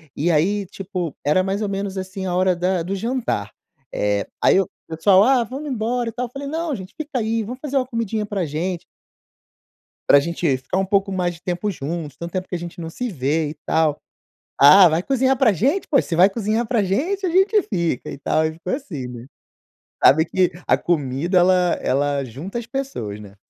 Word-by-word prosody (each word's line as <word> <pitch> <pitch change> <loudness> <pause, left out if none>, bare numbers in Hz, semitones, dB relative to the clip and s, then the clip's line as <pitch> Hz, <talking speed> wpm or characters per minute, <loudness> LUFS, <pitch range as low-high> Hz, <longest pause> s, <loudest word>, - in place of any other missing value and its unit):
e 170 +4 +1
aí 195 +6 +1
tipo, 185 -5 -5
era 150 +6 +3
mais 195 +2 -2
ou 210 - -1
menos 195 0 -3
assim 190 0 -5
a 180 - -2
hora 185 0 +3
da 180 +1 0
do 190 +4 -3
jantar. 225 - -2 0.4
É, 105 0 0 0.2
aí - - +5
eu, 195 -2 +1 0.2
pessoal: 185 +4 +4
"Ah, 255 +1 +4
vamos 270 +6 -6
embora, 240 0 -1
e - - -6
tal." 250 0 -3
Falei: 275 +3 -7
"Não 320 +1 -2
gente 190 -2 -9
fica 300 -3 -4
aí, 225 0 -1
vamos 245 +5 -7
fazer 285 0 -5
uma 260 - +1
comidinha 225 -3 -2
pra 200 -4 -2
gente." 170 +4 -3 1.2
"Pra 140 - +7
gente 170 -2 0
ficar 130 +8 -3
um 195 - 0
pouco 195 +1 +1
mais 180 -2 -1
de 165 - -17
tempo 180 +3 -2
juntos, 155 -3 -5
tanto 170 0 -6
tempo 185 0 -3
que - - -5
a - - -1
gente 170 0 -8
não 165 -1 -5
se 245 +8 -4
vê, 150 -1 -1
e - - -7
tal." 160 -2 +2 0.6
"Ah, 165 +7 +9
vai 160 +3 0
cozinhar 265 +1 +2
pra 250 -3 +4
gente 275 - 0
poxa, 275 - +2
se 170 - -1
vai 180 +4 +6
cozinhar 220 +2 -1
pra 225 -1 +1
gente 330 - -1
a - - +1
gente 385 +5 +4
fica, 170 - -2
e - - -7
tal.", 155 +3 +1
e 160 0 -3
foi 185 - -1
assim, 160 - -6
né. 120 -1 -9 0.8
Sabe 160 +4 +6
que 185 +1 +1 0.2
a - - +4
comida 160 +2 0
ela 180 -1 +3
ela 140 +1 0
junta 145 - -6
as 235 - -8
pessoas, 245 - -4
né. 100 -2 -12
185 Hz, 210 wpm, -21 LUFS, 160-230 Hz, 1.2 s, Ah